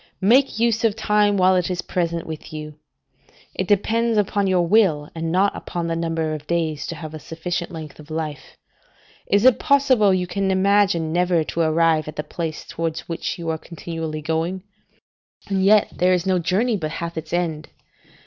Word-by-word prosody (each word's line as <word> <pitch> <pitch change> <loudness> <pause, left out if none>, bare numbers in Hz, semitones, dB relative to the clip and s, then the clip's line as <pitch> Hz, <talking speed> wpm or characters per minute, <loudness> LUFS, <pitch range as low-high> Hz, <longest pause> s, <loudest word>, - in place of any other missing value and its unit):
Make 255 +7 +4
use 230 -1 +1
of 220 -3 +2
time 210 -2 +2
while 185 0 +4
it 180 -1 +1
is 180 -1 -3
present 170 -2 -2
with 160 -1 -8
you. 150 -1 -8 0.7
It 185 - -3
depends 225 +3 +2
upon 205 -1 +1
your 180 -2 +2
will, 170 -7 +2
and 165 0 -3
not 195 +3 +2
upon 175 -1 -4
the 165 0 -1
number 165 -1 -1
of 150 -1 -7
days, 160 -3 -1
to 170 - -5
have 160 -1 -8
a 155 - -7
sufficient 170 +3 -4
length 155 -3 -9
of 155 0 -13
life. 155 -3 -5 0.7
Is 205 +3 +3
it 255 -2 +6
possible 260 -7 +4
you 185 -1 +1
can 195 +2 -1
imagine 190 -4 +2
never 175 -2 +2
to 165 - -3
arrive 160 -1 +2
at 155 - -7
the 150 - -3
place 160 +1 -5
towards 165 -1 -3
which 165 +2 -3
you 170 -2 -4
are 160 - -3
continually 160 -2 -6
going? 165 +4 -2 0.8
and 195 -1 0
yet 205 +1 +5
there 180 +1 +3
is 180 0 0
no 185 -1 +2
journey 205 +7 +1
but 155 -3 -4
hath 170 0 -5
its 160 -1 -6
end. 165 -3 -2
170 Hz, 185 wpm, -22 LUFS, 160-195 Hz, 0.8 s, it